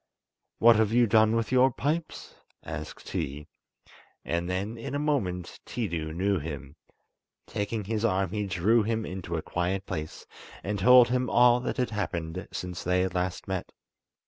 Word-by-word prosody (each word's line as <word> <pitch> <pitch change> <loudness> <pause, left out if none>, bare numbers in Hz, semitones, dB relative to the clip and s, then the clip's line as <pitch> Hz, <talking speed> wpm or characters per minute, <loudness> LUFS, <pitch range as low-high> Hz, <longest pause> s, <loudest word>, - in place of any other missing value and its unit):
"What 115 -1 +6
have 110 -1 +2
you 120 +1 +5
done 110 0 +4
with 115 0 -1
your 130 +1 +5
pipes?" 155 +6 -3 0.3
asked - - -7
he; 70 +2 -3 0.8
and 85 +1 -1
then 100 +5 -2
in 130 +4 -5
a - - +1
moment 105 - -2
Tiidu 85 -9 -3
knew 95 +1 +1
him. 70 -2 -7 0.7
Taking 105 +1 -3
his 110 +2 -2
arm 95 -5 +1
he 105 -1 -2
drew 95 +5 +3
him 110 +1 -1
into 90 -3 -4
a 80 - -4
quiet 95 +2 -2
place 75 0 -6 0.4
and 100 0 -2
told 125 +4 +7
him 125 -1 0
all 120 +2 +5
that 125 - -3
had 125 -2 0
happened 90 -3 -3
since 90 -1 -5
they 90 +1 +2
had 95 0 -1
last 90 0 -2
met. 95 -2 -3
100 Hz, 165 wpm, -28 LUFS, 90-115 Hz, 0.8 s, told